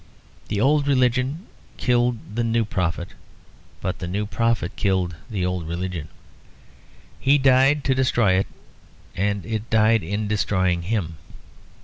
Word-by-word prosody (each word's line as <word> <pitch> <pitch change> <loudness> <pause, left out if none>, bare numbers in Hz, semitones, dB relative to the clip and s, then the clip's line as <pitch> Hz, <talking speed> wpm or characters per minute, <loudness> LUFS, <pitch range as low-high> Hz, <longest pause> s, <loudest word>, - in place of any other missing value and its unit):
The 105 - -2
old 145 +4 +3
religion 130 - +1 0.3
killed 120 -1 +2 0.2
the 120 - +1
new 115 0 +1
prophet; 90 -3 -2 0.7
but 90 - -3
the 90 - -4
new 100 +4 -2
prophet 110 -2 -1
killed 95 -3 0
the 95 -5 -2
old 90 -3 -2
religion. 85 -2 -4 1.1
He 140 +2 +4
died 135 +1 +4
to 135 - +2
destroy 120 -6 +2
it, 95 +1 +1 0.7
and 100 +1 -1
it 110 0 -4
died 110 0 +4
in 100 +5 -3
destroying 95 -4 +1
him. 85 -4 -2
105 Hz, 130 wpm, -23 LUFS, 95-125 Hz, 1.1 s, He